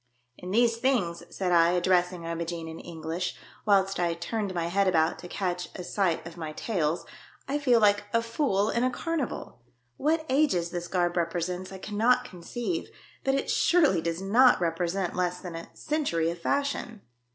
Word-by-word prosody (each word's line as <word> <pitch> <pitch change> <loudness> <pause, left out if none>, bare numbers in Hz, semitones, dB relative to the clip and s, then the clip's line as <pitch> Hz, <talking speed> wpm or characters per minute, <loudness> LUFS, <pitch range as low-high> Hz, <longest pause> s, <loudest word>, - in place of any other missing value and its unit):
" - - -44
In 180 - -7
these 230 +3 +3
things," 230 -10 +1
said 185 -2 -2
I, 170 0 +5
addressing 180 -1 +1
I 165 - -2
mo 170 0 -2
gene 165 -1 -5
in 160 0 -7
English, 165 +1 -4 0.3
whilst 195 -2 +3
I 170 -1 +1
turned 200 +4 -3
my 170 -1 0
head 195 +3 +2
about 160 -3 +2
to 175 - -8
catch 180 -1 -3
a 180 - -5
sight 175 -3 0
of 170 0 -9
my 155 -2 -5
tails, 165 -5 -1 0.2
" - - -27
I 285 +2 0
feel 250 -5 +4
like 205 -1 +4
a 230 +1 +2
fool 230 -4 +1
in 235 - +1
a 255 - +3
carnival. 290 - -4 0.4
What 315 +2 +1
ages 260 - +2
this 175 -1 -4
garb 175 -1 0
represents 180 +2 -2
I 190 - -7
cannot 215 +6 +2
conceive, 240 - -4 0.3
but 270 0 +2
it 275 - -1
surely 305 - +4
does 170 +2 -3
not 245 +6 +5
represent 175 +2 -1
less 180 0 0
than 180 -2 -7
a 165 0 -7
century 225 - 0
of 170 - -8
fashion." 280 -3 -1
185 Hz, 185 wpm, -28 LUFS, 170-230 Hz, 0.4 s, I